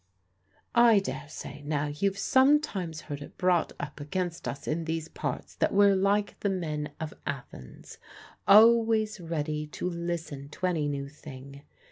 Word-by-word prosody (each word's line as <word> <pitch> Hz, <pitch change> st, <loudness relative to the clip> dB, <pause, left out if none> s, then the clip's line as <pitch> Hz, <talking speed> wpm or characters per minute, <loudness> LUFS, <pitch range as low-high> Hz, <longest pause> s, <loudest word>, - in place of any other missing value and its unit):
I 235 Hz, -2 st, +6 dB
daresay, 150 Hz, -6 st, -5 dB
now, 145 Hz, 0 st, -1 dB
you've 190 Hz, +7 st, -1 dB
sometimes 260 Hz, -, +2 dB
heard 145 Hz, -2 st, -7 dB
it -, -, -11 dB
brought 180 Hz, -2 st, +2 dB
up 145 Hz, +1 st, -6 dB
against 170 Hz, +3 st, -3 dB
us 140 Hz, -, -5 dB
in 165 Hz, +1 st, -1 dB
these 160 Hz, 0 st, -2 dB
parts -, -, -5 dB
that -, -, +1 dB
we're 200 Hz, -1 st, +6 dB
like 200 Hz, +2 st, +1 dB
the 200 Hz, -, 0 dB
men 155 Hz, -6 st, -3 dB
of 160 Hz, -1 st, -5 dB
Athens, 130 Hz, -, -8 dB, 0.5 s
always 220 Hz, 0 st, +6 dB
ready 155 Hz, -3 st, -3 dB
to 150 Hz, -, -4 dB
listen 170 Hz, -5 st, -4 dB
to 185 Hz, -, -4 dB
any 165 Hz, -5 st, +1 dB
new 140 Hz, -1 st, -3 dB
thing. 140 Hz, -1 st, -11 dB
165 Hz, 145 wpm, -28 LUFS, 150-195 Hz, 0.5 s, I